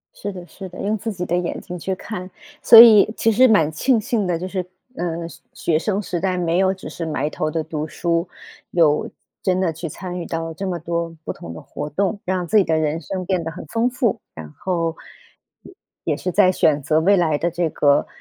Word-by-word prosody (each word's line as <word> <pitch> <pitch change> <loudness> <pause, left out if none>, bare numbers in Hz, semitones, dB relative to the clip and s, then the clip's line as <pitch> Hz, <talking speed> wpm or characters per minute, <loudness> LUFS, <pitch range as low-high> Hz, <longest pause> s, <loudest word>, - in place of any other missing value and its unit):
是 205 0 -5
的， 180 -2 -9
是 190 +3 -9
的， 180 - -10
用 210 +2 0
自 220 +1 -4
己 180 -2 -4
的 175 - 0
眼 180 -1 -2
睛 180 0 -7
去 190 +3 -2
看。 185 -1 -7 0.3
所 230 - +9
以 215 -2 +9
其 225 - +2
实 250 +4 +5
蛮 165 -10 +4
庆 235 +9 +2
幸 215 -1 -1
的， 175 -2 0
就 185 +2 -5
是， 185 -1 -3 0.3
呃， 170 -1 -3
学 - - -13 0.2
学 155 -2 0
生 200 +4 -1
时 175 -3 -3
代 185 -1 0
没 170 0 0
有 190 0 +3
只 190 - -9
是 165 - -5
埋 150 -1 -1
头 155 - -2
地 160 +1 -1
读 155 0 -4
书， 170 +2 -1 0.4
有 155 -4 +2 0.3
真 185 0 +1
的 170 -4 +1
去 165 +2 -6
参 180 +3 -6
与 175 - -5
到 165 0 -4
这 195 +5 -5
么 180 -2 -2
多 170 0 -3
不 - - -3
同 85 - -9
的 80 - -9
活 145 - -6
动， 200 +5 -1
让 185 -1 -1
自 215 - +1
己 200 - +6
的 160 -2 +1
人 155 +1 -1
生 185 +1 -5
变 185 -2 0
得 165 - -3
很 165 - -9
丰 230 +1 0
富。 245 -4 -1
然 80 -2 -9
后， 170 -3 -1 1.1
也 - - 0
是 180 - -3
在 190 -1 +5
选 150 -5 +2
择 155 +3 +2
未 200 +5 +4
来 160 -5 +2
的 170 +3 0
这 170 0 -1
个， 145 -1 +3
180 Hz, 245 characters per minute, -21 LUFS, 165-195 Hz, 1.1 s, 所